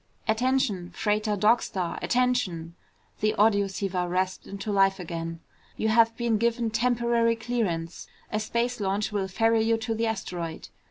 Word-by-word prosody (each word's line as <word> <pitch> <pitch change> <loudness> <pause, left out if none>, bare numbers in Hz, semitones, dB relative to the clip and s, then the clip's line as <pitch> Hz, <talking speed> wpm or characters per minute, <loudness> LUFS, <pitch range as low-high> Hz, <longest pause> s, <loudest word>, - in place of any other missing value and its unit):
"Attention! 220 -5 +1
Freighter 210 0 0
Dog 215 +4 +4
Star! 180 -3 -3
Attention!" 240 -10 0 0.5
the 215 0 +1
audioceiver 195 -3 +1
rasped 185 +1 -1
into 200 +2 -5
life 195 -1 +3
again. 165 -1 -5 0.4
"You 220 - 0
have 230 +1 +4
been 235 -3 +1
given 235 0 +1
temporary 235 0 +2
clearance. 220 -8 -3 0.2
A 215 - 0
space 235 +3 -1
launch 200 +1 -1
will 200 -2 -1
ferry 225 +4 +2
you 225 +1 +2
to 225 0 -2
the 225 +1 0
asteroid. 175 -6 -4
215 Hz, 145 wpm, -27 LUFS, 190-230 Hz, 0.5 s, Dog